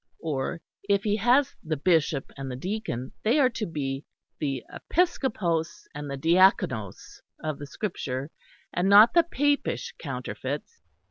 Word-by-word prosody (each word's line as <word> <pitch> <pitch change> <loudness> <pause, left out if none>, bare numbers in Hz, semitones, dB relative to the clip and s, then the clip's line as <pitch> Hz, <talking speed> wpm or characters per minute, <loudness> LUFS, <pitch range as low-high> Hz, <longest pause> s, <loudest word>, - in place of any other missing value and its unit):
Or 155 +1 -2 0.3
if 200 0 +3
he 210 -1 +1
has 250 +6 +3
the 155 -2 -2
bishop 155 -3 +1
and 135 -1 -6
the 125 - -4
deacon 160 - -4
they 230 +7 +3
are 260 -3 +4
to 220 -2 -3
be 140 -4 -3 0.4
the 135 -4 -2 0.3
Episcopos 210 - +1
and 145 0 -6
the 140 - -4
Diaconos 160 - +2 0.2
of 155 -2 -3
the 145 - -7
Scripture, 140 -6 -4 0.4
and 180 +2 +1
not 210 +3 +8
the 340 - +7
Papish 290 -3 0
counterfeits! 465 -1 -5
170 Hz, 140 wpm, -27 LUFS, 140-220 Hz, 0.4 s, not